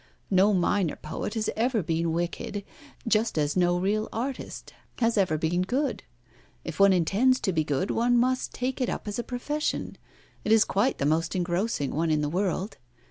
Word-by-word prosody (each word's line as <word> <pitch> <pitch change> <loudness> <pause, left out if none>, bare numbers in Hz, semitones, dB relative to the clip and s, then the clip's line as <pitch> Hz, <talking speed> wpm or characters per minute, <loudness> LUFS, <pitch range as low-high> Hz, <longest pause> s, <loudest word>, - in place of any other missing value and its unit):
No 195 +2 +5
minor 185 -2 +1
poet 160 +7 -5
has 220 -1 -1
ever 230 -2 +1
been 165 0 0
wicked, 175 +4 -3 0.4
just 225 -3 +2
as 150 -1 +1
no 175 -1 +3
real 210 +4 0
artist 255 +4 -5 0.2
has 230 -1 +2
ever 185 -7 +2
been 165 +3 0
good. 255 +8 -1 0.6
If 165 +1 -7
one 200 0 +7
intends 205 +9 +3
to 190 - 0
be 160 -1 +2
good, 150 +6 -1
one 240 +1 +2
must 255 +2 +1
take 255 +1 -3
it 250 - +1
up - - -4
as 205 +3 -3
a - - -1
profession. 295 +6 -3 0.4
It 215 - -1
is 220 -1 +6
quite 220 +7 +1
the - - -1
most 160 +3 +1
engrossing 175 -3 -1
one 165 +2 0
in 155 -1 +2
the 150 - -1
world. 185 +3 -2
195 Hz, 185 wpm, -27 LUFS, 170-230 Hz, 0.6 s, one